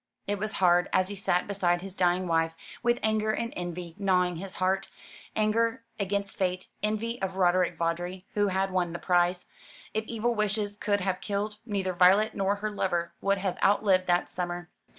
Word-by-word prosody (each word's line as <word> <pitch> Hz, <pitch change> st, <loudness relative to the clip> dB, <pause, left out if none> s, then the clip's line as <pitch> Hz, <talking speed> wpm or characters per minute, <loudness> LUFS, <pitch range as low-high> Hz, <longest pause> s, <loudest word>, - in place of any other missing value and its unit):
It 205 Hz, 0 st, -2 dB
was 215 Hz, +1 st, -2 dB
hard, 180 Hz, -1 st, +3 dB
and 185 Hz, -, +3 dB
he 205 Hz, -, -4 dB
sat 180 Hz, -2 st, +1 dB
beside 180 Hz, -3 st, 0 dB
his 195 Hz, -1 st, -7 dB
dying 180 Hz, 0 st, +2 dB
wife, 165 Hz, -1 st, +1 dB, 0.3 s
with 240 Hz, 0 st, +2 dB
anger 215 Hz, 0 st, +1 dB
and 230 Hz, +2 st, -1 dB
envy 175 Hz, -1 st, -5 dB
gnawing 180 Hz, -3 st, +2 dB
his 190 Hz, +2 st, -7 dB
heart 190 Hz, +1 st, 0 dB, 0.5 s
anger 225 Hz, +2 st, +1 dB, 0.2 s
against 200 Hz, 0 st, -1 dB
fate, 185 Hz, -1 st, -1 dB
envy 215 Hz, +3 st, -1 dB
of 190 Hz, -1 st, -2 dB
Roderick 180 Hz, -1 st, +2 dB
Vawdrey, 175 Hz, +2 st, -2 dB
who 205 Hz, -1 st, +2 dB
had 190 Hz, 0 st, 0 dB
won 180 Hz, -2 st, 0 dB
the -, -, -3 dB
prize. 175 Hz, 0 st, +1 dB, 0.5 s
If 220 Hz, 0 st, -1 dB
evil 235 Hz, +1 st, -1 dB
wishes 210 Hz, -1 st, 0 dB
could 205 Hz, -1 st, 0 dB
have 185 Hz, 0 st, -1 dB
killed, 210 Hz, +1 st, -2 dB
neither 195 Hz, -3 st, -1 dB
Violet 190 Hz, +5 st, +5 dB
nor 195 Hz, +1 st, +1 dB
her 210 Hz, +1 st, -3 dB
lover 175 Hz, -4 st, -1 dB
would 200 Hz, 0 st, +2 dB
have 190 Hz, -1 st, -2 dB
outlived 195 Hz, -2 st, +3 dB
that 175 Hz, 0 st, +2 dB
summer. 175 Hz, -1 st, -4 dB
190 Hz, 180 wpm, -28 LUFS, 180-205 Hz, 0.5 s, Violet